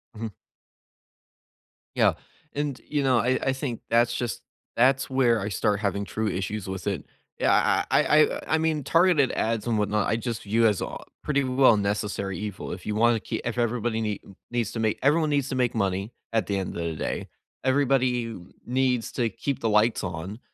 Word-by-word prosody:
Mhm. 110 -1 -5 1.6
Yeah. - - +4 0.4
And, 145 -2 -2
you 145 -2 0
know, 130 -3 +4
I 125 +3 +1
I 135 - +1
think 130 -3 -4
that's 120 0 +3
just 120 -2 -3 0.3
that's 130 +3 +3
where 125 -4 +3
I 100 +1 -3
start 105 0 0
having 100 -1 -1
true 110 +2 -2
issues 100 +1 -3
with 95 -1 -5
it. 100 -3 -2 0.3
Yeah. - - +3 0.4
I - - +5
I 150 - +4
I - - -1
I - - +3
mean, 160 -2 0
targeted 165 -3 +4
ads 110 -1 -1
and 115 -2 +1
whatnot, 105 0 +1
I - - +1
just 115 0 -3
view 115 +3 +3
as 105 -3 +1
a - - -4 0.3
pretty 140 -2 +1
well 130 -3 +4
necessary 100 -2 -2
evil. 105 -2 -5
If 90 - -7
you 105 - -2
wanna 115 +1 +4
keep - - -4
if 120 0 -2
everybody 120 -1 0
nee 105 -2 -2 0.3
needs 120 -3 -1
to 115 - -4
make 110 -1 0
everyone 155 +3 +3
needs 140 -2 +1
to - - -2
make 125 -2 +1
money 100 +1 -1 0.2
at 115 - +2
the 100 - 0
end 95 - -4
of 85 - -2
the 85 -1 -2
day. - - -3 0.4
Everybody 130 -4 +2 0.3
needs 125 -1 +1
to 120 -3 0
keep 130 +6 -3
the 115 - +1
lights 105 +2 +3
on. 90 +5 -5
115 Hz, 195 wpm, -26 LUFS, 105-130 Hz, 1.6 s, I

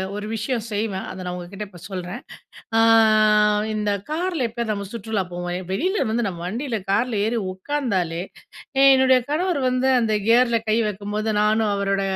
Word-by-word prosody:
ஒரு 210 - -5
விஷயம் 230 +1 -2
செய்வேன். 205 -2 -2
அத - - -8
நான் 180 - -3
உங்ககிட்ட 190 +4 -7
இப்ப 180 -3 -14
சொல்றேன். 185 +2 -5 0.6
அ - - +5 0.9
இந்த 210 -1 -1 0.2
கார்ல 335 -3 -1
எப்பயாவது 230 -1 -3
நம்ம 200 -1 -5
சுற்றுலா 220 -3 -2
போவோம் 175 +1 -4
வெளில 370 - 0
வந்து 230 +1 0
நம்ம 175 -3 -6
வண்டில, 230 +4 -3
கார்ல 220 0 +1
ஏறி 230 +1 0
உட்காந்தாலே, 185 - -2 0.6
ஏ - - +6
என்னுடைய 260 -1 +5
கணவர் 330 +1 0
வந்து 255 +1 +1
அந்த 220 -2 +1
கியர்ல 235 0 +4
கை 215 - +3
வைக்கும்போது 210 +2 -3
நானும் 215 0 +2
அவரோட 195 0 0
215 Hz, 160 wpm, -22 LUFS, 195-250 Hz, 0.9 s, ஏ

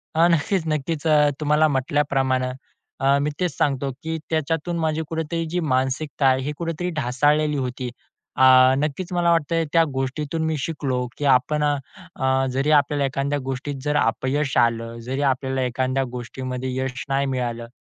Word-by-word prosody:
अ, 165 +2 +5
नक्कीच-नक्कीच. 160 -2 -1
अ, 150 -1 +5
तुम्हाला 150 +1 +3
म्हटल्याप्रमाणे 135 -2 0 0.5
अ, 135 +1 +3
मी 145 - 0
तेच 180 -2 0
सांगतो, 140 -1 0
की 160 0 -2
त्याच्यातून 160 +2 -1
माझी 160 -1 0
कुठेतरी 165 +1 -2
जी 180 - 0
मानसिकता 135 -1 -1
आहे, 130 0 +3
ही 140 +3 -3
कुठेतरी 170 +1 -3
ढासाळलेली 150 +3 +2
होती. 125 -1 -3 0.5
अ, 130 - +3 0.3
नक्कीच 155 +6 -2
मला 175 -1 +2
वाटतंय 165 0 +1
त्या 165 - +6
गोष्टीतून 140 +4 -2
मी 160 0 0
शिकलो, 135 -3 -2 0.2
की 145 - -3
आपण 150 +4 +1
अ, 145 -1 +2 0.4
अ, 130 0 +1
जरी 135 +4 0
आपल्याला 145 -1 +3
एखाद्या 140 +2 -1
गोष्टीत 135 +2 -4
जर 150 0 0
अपयश 135 +4 0
आलं, 115 -1 +1
जरी 135 +2 -2
आपल्याला 130 0 -2
एखाद्या 130 +2 0
गोष्टीमध्ये 125 +1 -5
यश 130 0 -3
नाही 135 +1 +1
मिळालं. 120 -2 -3
140 Hz, 155 wpm, -23 LUFS, 130-155 Hz, 0.5 s, त्या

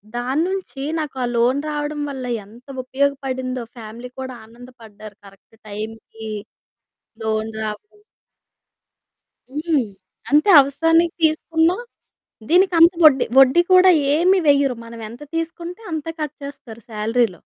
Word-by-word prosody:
దాన్నుంచి 285 +5 -2 0.2
నాకా 275 -4 -4
లోన్ 245 +4 +2
రావడం 295 0 -3
వల్ల 265 -2 -6 0.2
ఎంత 235 +4 -17 0.2
ఉపయోగపడిందో 260 -2 -2
ఫ్యామిలీ 230 +2 -9
కూడా 260 -1 -5
ఆనందపడ్డారు. 225 -3 -14
కరెక్ట్ 195 +3 -19
టైమ్‌కి 220 +1 -8 1.0
లోన్ 220 0 -1
రావడం. 415 - -7 1.5
హ్మ్. 295 -1 -1 0.5
అంతే 300 +7 +4
అవసరానికి 325 +5 +2
తీసుకున్నా 320 +2 +2 0.7
దీనికంత 345 -1 +5
వడ్డీ 280 -4 +6
వడ్డీ 270 +5 +7
కూడా 370 0 +7 0.3
ఏమి 365 +4 +3
వెయ్యరు. 280 -3 +3
మనమెంత 230 +1 -9
తీసుకుంటే 340 +4 -5
అంత 315 -1 -4
కట్ 300 -1 -4
చేస్తారు 235 -5 -10
సాలరీలో. 225 +1 0
270 Hz, 105 wpm, -20 LUFS, 230-320 Hz, 1.5 s, వడ్డీ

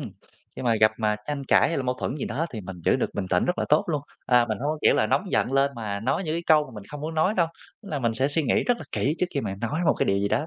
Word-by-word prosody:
ừm, - - -5 0.5
khi - - -5
mà 115 -2 +2
gặp 110 - +5
mà 105 -1 +1
tranh 145 -2 -4
cãi - - +4
hay 165 - -1
là 135 - -1
mâu 125 0 -1
thuẫn 130 - -3
gì 150 - -3
đó 150 +8 -2
thì 110 - -5
mình 95 0 -8
giữ - - +4
được - - -1
bình 100 -2 -2
tĩnh 90 - +3
rất 180 - -1
là - - +1
tốt 150 - +4
luôn. 150 -4 -1 0.2
Ờ, 125 -1 +5
mình 110 - -2
hông 140 - -3
có, 155 - -3
kiểu - - +5
là, - - +2
nóng - - +2
giận - - +1
lên 135 +1 +3
mà 105 -3 -4
nói 135 - 0
những 155 0 -2
cái 170 - -2
câu 155 -2 +5
mà 130 - -12
mình 105 -2 -8
không 145 - -8
muốn 160 +2 -4
nói 160 +7 +2
đâu, 170 -2 +3 0.4
tức 200 - -11
là 150 -5 -2
mình 115 -3 0
sẽ 130 +4 +1
suy 155 +3 0
nghĩ - - +1
rất 245 - +2
là - - -8
kỹ 145 +4 0
trước 180 - +1
khi 140 - +1
mà 95 - -3
nói 145 +8 -2
một - - +4
cái - - 0
điều 100 0 +2
gì 100 - 0
đó. 150 +9 0
135 Hz, 350 wpm, -25 LUFS, 115-155 Hz, 0.5 s, gặp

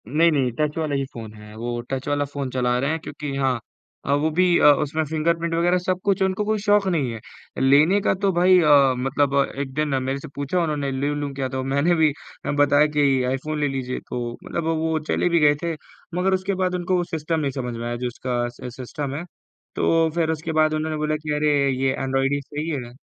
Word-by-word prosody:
नहीं, 160 +7 +3
नहीं, 135 -5 +1
टच 150 0 0
वाला 155 -3 -1
ही 135 0 -1
फ़ोन 110 -2 -8
है। 105 0 -13
वो 120 +1 -4
टच 135 +1 -3
वाला 145 0 0
फ़ोन 140 -1 -5
चला 125 -1 +1
रहे 140 +3 0
हैं, 160 - -1
क्योंकि 150 -3 -6
हाँ 130 -3 +1 0.5
अ, 140 - +1
वो 145 +2 +2
भी 185 - +5
अ, - - +4 0.2
उसमें 155 +2 -1
फिंगरप्रिंट 165 +2 -1
वग़ैरह 175 +2 +2
सब 180 0 -1
कुछ 200 -1 +1
है, - - +5
उनको 190 +2 -1
कोई 215 0 0
शौक 205 -1 +3
नहीं 150 -9 0
है 115 - -7 0.4
लेने 150 +9 +5
का। - - +2
तो 195 - +4
भाई 180 +1 +5
अ, 145 -5 +5
मतलब 135 +2 0 0.2
एक 135 -2 -4
दिन 150 +2 0
मेरे 135 +1 -2
से 145 - -9
पूछा 145 +6 -1
उन्होंने, 145 -4 -1
"ले 135 +2 -1
लूँ 145 -1 -3
क्या?" 135 -1 -3
तो 130 0 -3
मैंने 140 +6 +2
भी 160 -2 +4 0.4
अ, - - 0
बताया 145 +1 +4
कि, 140 -3 +3
"आईफ़ोन 150 +4 -3
ले 145 - +1
लीजिए।" 130 -2 -3
तो 120 -1 -3
मतलब 170 - -3
वो 165 0 0
वो 160 0 0
चले - - +1
भी 170 -1 +3
गए 145 -1 +5
थे। 170 -1 -1 0.4
मगर 185 +2 +1
उसके 190 +1 0
बाद 180 0 0
उनको 180 0 0
सिस्टम 160 0 -1
नहीं 140 -3 -1
समझ 125 -3 -4
में 115 - -5
आया, 120 - -2
जो 125 +1 -3
इसका 120 0 -2
स 120 0 -9
सिस्टम 135 +2 -5
है। 155 - -4 0.5
तो 165 0 +2
फिर 165 -2 +1
उसके 160 +1 -3
बाद 155 0 +2
उन्होंने 155 0 -2
बोला 155 0 0
कि, 155 0 -3
"अरे! 150 0 +2 0.3
ये 135 - +3
ऐन्ड्रॉइड 135 +1 0
ही 145 - -1
सही 150 +3 -5
है।" 125 -6 -4
145 Hz, 235 wpm, -23 LUFS, 135-165 Hz, 0.5 s, भी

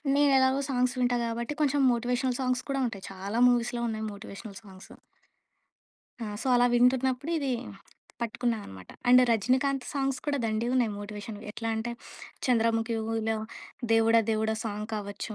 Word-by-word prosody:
నేను 290 -1 +4
ఎలాగో 260 +1 +3
సాంగ్స్ 250 -1 +1
వింటా 245 0 +2
కాబట్టి 235 +5 -3
కొంచెం 290 -1 +2
మోటివేషనల్ 245 +1 -1
సాంగ్స్ 255 0 0
కూడా 275 -1 0
ఉంటాయి 200 -5 -7
చాలా 195 +4 -3
మూవీస్‌లో 240 0 0
ఉన్నాయి 220 -1 -3
మోటివేషనల్ 200 +1 -9
సాంగ్సు. 190 -2 -13 1.3
ఆ! - - -3 0.2
సో, - - -5
అలా 245 0 +5
వింటున్నప్పుడు 255 +4 +2
ఇదీ, 275 -3 -1 0.7
పట్టుకున్నా 235 0 -1
అనమాట. 95 -1 -11 0.2
అండ్ 250 +1 +8
రజనీకాంత్ 255 +4 +1
సాంగ్స్ 270 -2 -1
కూడా 290 -1 0
దండిగా 225 +2 0
ఉన్నాయి 240 -4 +2
మోటివేషన్‌వి. 205 0 -7
ఎట్లా 225 0 -4
అంటే 225 +2 -3 0.6
'చంద్రముఖిలో,' 225 -2 +1 0.7
'దేవుడా 225 0 +5
దేవుడా' 220 0 0
సాంగ్ 210 -1 -4
కావచ్చు, 205 +1 -5
235 Hz, 140 wpm, -28 LUFS, 220-255 Hz, 1.3 s, అండ్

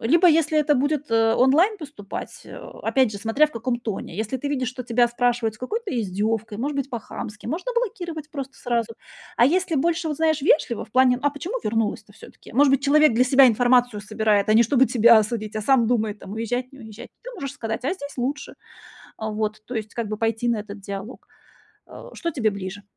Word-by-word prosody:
Либо 330 +10 +4
если 315 -2 +3
это 295 0 +3
будет, 285 0 -1
э, 225 0 +3
онлайн 315 - +3
поступать, 290 - -8
э, - - -10
опять 260 -5 -1
же, 200 - -6
смотря 230 +9 +2
в - - -15
каком 240 -1 -3
тоне. 215 -6 -6
Если 220 +4 -3
ты 285 +3 -4
видишь, 260 -4 -1
что 255 0 -7
тебя 240 0 +2
спрашивают 240 -2 0
с - - -18
какой-то 430 - -4
издёвкой, 215 0 -2
может 285 +4 -2
быть, 275 - -2
по-хамски, 215 -3 -7
можно 370 - -3
блокировать 345 - -3
просто 275 -2 -6
сразу. 235 -2 -2 0.4
А 235 - +5
если 360 +1 +1
больше, 330 +3 0
вот, 300 - -3
знаешь, 315 -3 +1
вежливо, 270 -6 +2
в - - -24
плане: 255 0 +4
"А 290 - +3
почему 335 - -6
вернулась-то 215 -1 -2
всё-таки?" - - -15
Может 280 +1 +5
быть, 275 - +4
человек 300 -1 +5
для 250 +2 +4
себя 265 +1 +6
информацию 245 -1 +3
собирает, 215 -1 0
а 215 - +4
не 230 - +7
чтобы 260 +3 +3
тебя 235 -1 +7
осудить, 215 0 -3
а - - -1
сам 245 -1 +3
думает, 220 -3 0
там, 195 - -9
уезжать, 245 +4 -3
не 270 - -14
уезжать, 215 -2 -11
ты - - -8
можешь 280 -8 -6
сказать: 225 0 -5
"А 295 - +1
здесь 285 -5 -9
лучше". 280 +5 -3 0.6
А, 220 - -4
вот, 215 0 -3
то 250 - -7
есть 220 0 -5
как 235 -2 -3
бы 215 - -3
пойти 225 +2 -1
на 230 -2 +1
этот 205 -1 -9
диалог. 200 +4 -8 0.6
Э, - - -12
что 335 - -3
тебе 220 -6 +1
ближе? 200 0 -7
245 Hz, 210 wpm, -23 LUFS, 220-285 Hz, 0.6 s, не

